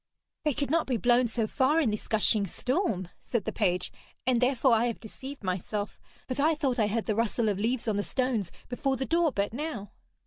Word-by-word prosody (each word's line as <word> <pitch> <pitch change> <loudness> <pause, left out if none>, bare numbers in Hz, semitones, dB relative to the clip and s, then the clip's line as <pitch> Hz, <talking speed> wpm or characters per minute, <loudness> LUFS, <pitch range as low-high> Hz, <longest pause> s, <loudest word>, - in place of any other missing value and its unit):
'They 300 -4 +2
could 280 -2 -1
not 330 0 +2
be 255 -3 +1
blown 240 +3 +4
so 225 0 0
far 270 +7 +2
in 265 -9 +2
this 210 - -4
gushing 215 -1 +2
storm,' 235 - -1
said 235 -5 -2
the - - -1
page, 180 -4 0 0.3
'and 255 -2 +3
therefore 255 0 +4
I 230 +2 +3
have 235 - -3
deceived 265 +4 -9
myself. 195 +3 -3 0.3
But 255 +1 -3
I 310 +3 +4
thought 270 -4 0
I 215 - +4
heard 220 +2 -1
the 215 - +1
rustle 230 0 +1
of 200 -2 -1
leaves 235 +3 0
on 210 -2 +1
the - - +2
stones 245 -9 -1 0.2
before 265 +2 -1
the 265 - -2
door 335 0 +2
but 205 -2 -1
now.' 245 -8 -4
235 Hz, 215 wpm, -29 LUFS, 210-265 Hz, 0.3 s, blown